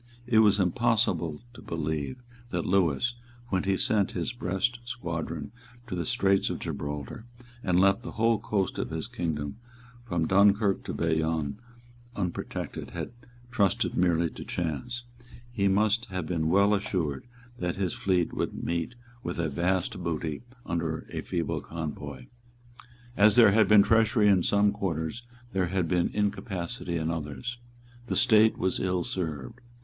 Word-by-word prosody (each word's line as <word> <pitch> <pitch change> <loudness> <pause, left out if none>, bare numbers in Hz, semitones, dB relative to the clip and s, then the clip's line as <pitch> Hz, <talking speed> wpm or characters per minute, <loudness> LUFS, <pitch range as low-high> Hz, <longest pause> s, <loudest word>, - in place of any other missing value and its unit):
It 120 -3 +4
was 105 -2 +5
impossible 100 -5 +1
to - - -12
believe 80 - -3 0.3
that 85 -5 -2
Lewis, 95 - +2 0.4
when 95 0 0
he 95 -1 +2
sent 105 -3 +1
his 85 +5 -2
Brest 120 +2 -1
squadron 85 -9 -4 0.3
to 115 - -7
the 85 -3 -2
Straits 95 0 +2
of - - -2
Gibraltar, 75 - -5 0.4
and 90 -1 +2
left 100 +3 +4
the 120 - -7
whole 115 0 +2
coast 100 -3 -1
of - - -2
his - - -3
kingdom 75 -1 -3 0.4
from 85 -9 -1
Dunkirk 100 +2 +4
to - - -4
Bayonne 80 0 0 0.6
unprotected, 90 -4 -4
had - - -5 0.4
trusted 100 -6 +1
merely 85 -2 +2
to - - -8
chance. 120 - -3 0.5
He 100 -5 +1
must 105 +4 +2
have 95 -6 -4
been 80 -2 0
well 100 +3 +4
assured 90 - -1 0.3
that 90 -1 -1
his 95 -3 -1
fleet 90 -3 +1
would - - -3
meet 85 +7 -2 0.3
with 90 - -4
a 85 -2 0
vast 90 +3 0
booty 80 -2 -2 0.2
under 80 -2 -2
a - - -3
feeble 85 -4 -2
convoy. 75 -5 -6 0.9
As 105 +1 +6
there 115 -4 +8
had 110 0 +4
been 105 -1 +7
treachery 110 -1 +4
in 95 -3 +5
some 100 +2 +3
quarters, 95 0 -3 0.3
there 95 -2 +1
had 90 -1 0
been 90 0 +2
incapacity 100 -2 -2
in 80 0 -1
others. 80 - -5 0.5
The - - -1
State 110 -3 +5
was 95 0 0
ill 90 -2 0
served. 85 - -4
95 Hz, 150 wpm, -28 LUFS, 85-105 Hz, 0.9 s, there